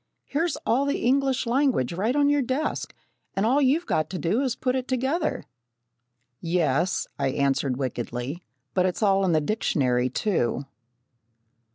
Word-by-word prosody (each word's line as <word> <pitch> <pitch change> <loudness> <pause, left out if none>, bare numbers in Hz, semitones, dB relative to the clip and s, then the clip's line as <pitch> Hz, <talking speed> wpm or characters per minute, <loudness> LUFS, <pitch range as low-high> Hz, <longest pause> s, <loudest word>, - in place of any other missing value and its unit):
"Here's 325 +4 -1
all 265 +5 +2
the 280 - -1
English 265 +1 +2
language 245 - +1
right 215 +9 0
on 290 -1 +4
your 290 0 +3
desk, 265 +4 -2 0.4
and 195 - +1
all 265 +6 +3
you've 290 +6 +2
got 155 - 0
to 185 - -4
do 185 +9 0
is 260 -4 0
to - - -37
put 255 0 0
it 260 -1 -2
together." 265 +6 -1 1.0
"Yes," 165 0 +1
I 140 - +1
answered 135 -1 0
wickedly, 125 +3 -4 0.3
"but 185 -1 +3
it's 185 +4 -2
all 195 -1 +3
in 175 - +2
the 155 - +4
dictionary 130 - +1
too." 135 - -1
205 Hz, 160 wpm, -25 LUFS, -, 1.0 s, on